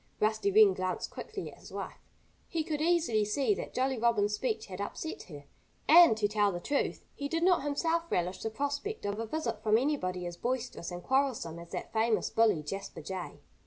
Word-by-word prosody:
Rusty 215 -1 +2
Wren 205 -1 +7
glanced 185 0 -3
quickly - - -6
at - - -16
his - - -13
wife. - - -6 0.5
He 330 -2 -1
could 305 -1 -3
easily 320 -10 +2
see 270 - +1
that - - -5
Jolly 260 -1 +1
Robin's 215 -3 +2
speech 220 0 -1
had 190 0 -7
upset 315 +10 -5
her. 145 -3 -9 0.4
And, 330 -8 +8
to 210 -1 +2
tell 205 -1 +2
the 175 - -4
truth, 285 +10 -1
he 285 - -4
did 330 +3 -1
not 365 -1 +4
himself 325 +4 0
relish 180 +1 -1
the 220 - -2
prospect 285 - -3
of 205 +1 -2
a 225 - -3
visit 230 -6 -3
from 215 0 +4
anybody 185 -10 -1
as 175 0 -6
boisterous 245 -7 -3
and 175 0 -7
quarrelsome 260 -12 0
as 170 0 -11
that - - -6
famous 225 0 +1
bully, 215 -9 +3
Jasper 195 +6 -6
Jay. 180 -6 -6
220 Hz, 200 wpm, -31 LUFS, 195-285 Hz, 0.5 s, And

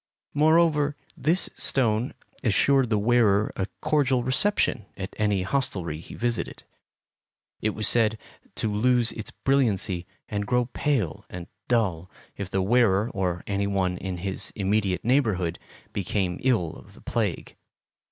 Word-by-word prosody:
Moreover, 150 -1 +3 0.2
this 170 +4 +1
stone 115 -2 0 0.3
assured 125 +4 +3
the 110 - +2
wearer 110 -2 +3
a 95 - -2
cordial 135 -5 +2
reception 130 - +1
at 95 0 -6
any 105 -3 +1
hostelry 90 - -2
he - - -11
visited. 120 -1 -2 1.0
It 110 0 0
was 110 - +3
said 110 -2 +4 0.4
to 110 -2 -1
lose 120 +2 +3
its 110 - -5
brilliancy 100 -10 +1 0.2
and 105 -1 -3
grow 125 -1 +2
pale 125 - -1
and 90 -1 -7 0.2
dull 95 -8 0 0.3
if 100 -3 -5
the 95 0 0
wearer 110 0 +3
or 90 -5 -2
any 100 0 -1
one 95 -2 0
in 95 -2 -4
his 95 +2 -3
immediate 100 -2 0
neighborhood 105 -10 +1 0.3
became 95 -2 -1
ill 110 -11 +1
of - - -15
the - - -16
plague. - - -2
105 Hz, 135 wpm, -26 LUFS, 95-125 Hz, 1.0 s, said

